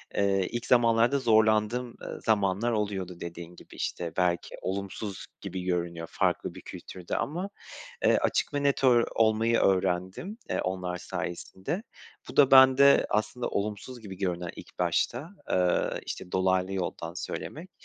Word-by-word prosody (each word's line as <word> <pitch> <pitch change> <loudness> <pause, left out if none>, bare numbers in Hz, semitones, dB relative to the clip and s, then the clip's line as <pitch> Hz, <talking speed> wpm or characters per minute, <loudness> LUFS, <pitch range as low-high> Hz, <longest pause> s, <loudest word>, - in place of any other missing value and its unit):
eee, 95 -2 +2
ilk 120 0 -3
zamanlarda 120 +2 +4
zorlandığım, 110 +1 +2
ııı, - - -7
zamanlar 105 +1 +1
oluyordu 95 -5 -2
dediğin 85 0 -8
gibi. - - -15
İşte, 85 -2 -3
belki 90 -1 0
olumsuz 100 +1 -4 0.2
gibi 95 0 -5
görünüyor 85 -2 -2
farklı - - 0
bir - - -9
kültürde 90 -2 -7
ama, 180 +7 -2 0.6
eee, - - +5
açık - - 0
ve 145 - 0
net 140 -1 +1
ör 120 -2 +5
olmayı 115 +1 +3
öğrendim, 95 - 0
eee, - - 0
onlar 90 -1 -3
sayesinde. 95 - -4 0.5
Bu - - -9
da 140 -1 +6
bende 135 +1 +7
aslında 120 +3 -1
olumsuz 105 +5 -4
gibi 100 -4 -9
görünen 90 -3 -2
ilk - - -12
başta, 120 - 0 0.2
eee, 90 -1 +1
işte 90 - -6
dolaylı 95 0 +1
yoldan 85 -3 -4
söylemek. 160 - -6
100 Hz, 140 wpm, -28 LUFS, 90-120 Hz, 0.6 s, bende